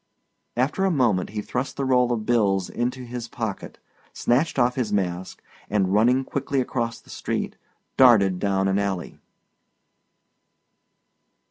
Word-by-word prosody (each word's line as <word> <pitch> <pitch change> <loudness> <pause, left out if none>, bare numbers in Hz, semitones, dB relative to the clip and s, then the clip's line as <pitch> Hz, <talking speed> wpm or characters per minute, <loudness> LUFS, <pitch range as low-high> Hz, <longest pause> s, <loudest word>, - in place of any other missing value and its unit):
After 140 +9 +1
a 195 - +3
moment 120 - +1
he 105 0 -4
thrust 125 +2 -3
the 140 - -1
roll 125 -2 +3
of 110 -3 -2
bills 100 -5 +1
into 125 +2 -2
his 120 -1 -6
pocket, 110 -4 -5 0.4
snatched 135 +7 +1
off 125 -1 +3
his 120 -5 -2
mask, 95 -2 -2 0.3
and 95 -2 +1
running 125 +5 +4
quickly 140 +1 -2
across 120 -2 -2
the - - -16
street, - - -3 0.4
darted 100 -8 +6
down 95 -1 +1
an 95 +1 +1
alley. 95 -3 -3
115 Hz, 135 wpm, -24 LUFS, 100-125 Hz, 0.4 s, darted